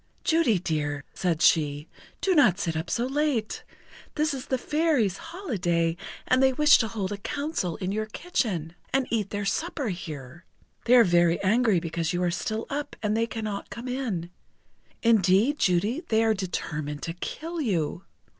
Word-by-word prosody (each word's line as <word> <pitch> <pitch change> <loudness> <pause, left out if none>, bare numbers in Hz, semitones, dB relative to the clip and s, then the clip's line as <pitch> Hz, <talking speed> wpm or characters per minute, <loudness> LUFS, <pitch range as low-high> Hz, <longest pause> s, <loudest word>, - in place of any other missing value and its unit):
"Judy 325 - +3
dear," 150 -4 -2
said 170 -3 0
she, 150 -1 +3 0.3
"do 385 - +2
not 270 - +5
sit 165 -4 -2
up 160 +2 -3
so 240 - 0
late. 270 -5 -1 0.5
This 305 -1 +1
is 265 -2 -6
the 260 - +1
Fairies' 290 - +1
holiday, 175 - -1 0.3
and 255 +1 +3
they 265 0 +4
wish 300 +2 +6
to 225 - +1
hold 205 -3 -3
a 205 - -3
counsel 280 - -3
in 185 0 -3
your 215 +1 -2
kitchen, 205 - -2 0.2
and 270 0 +2
eat 215 -4 0
their 205 -1 -3
supper 285 - -1
here. 155 -3 -7 0.4
They 245 - +6
are 240 - +8
very 175 -3 +3
angry 215 -1 +3
because 165 0 -2
you 175 +1 0
are 175 - +1
still 220 +4 -3
up, 290 +1 -4
and 210 0 +1
they 230 +1 +1
cannot 215 -3 -5
come 235 +6 -7
in. 225 -10 -3 0.7
Indeed, 225 - +4
Judy, 200 - +1
they 220 0 +3
are 225 -1 +3
determined 155 -6 -4
to 165 - -3
kill 325 - -5
you. 175 - -1
210 Hz, 170 wpm, -26 LUFS, 175-260 Hz, 0.7 s, are